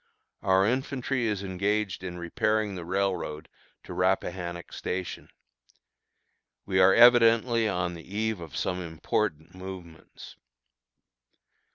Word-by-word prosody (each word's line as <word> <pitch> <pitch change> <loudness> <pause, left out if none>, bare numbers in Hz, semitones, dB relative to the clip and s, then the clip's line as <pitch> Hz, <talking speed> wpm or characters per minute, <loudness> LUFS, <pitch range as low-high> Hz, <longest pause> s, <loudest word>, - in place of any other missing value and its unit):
Our 95 0 +3
infantry 130 +1 -1
is 105 -2 -2
engaged 100 +1 -1
in 90 -1 -5
repairing 105 +5 0
the 90 -2 -6
railroad 90 -5 -2 0.4
to - - -8
Rappahannock 90 -1 -1
Station. 90 0 -5 1.4
We 95 -1 +1
are 95 +1 +6
evidently 115 -1 +6
on 90 -2 -1
the 85 - -9
eve 110 -2 -1
of 80 -4 -8
some 90 0 -1
important 85 0 -2
movements. 95 -3 -10
95 Hz, 105 wpm, -27 LUFS, 90-110 Hz, 1.4 s, are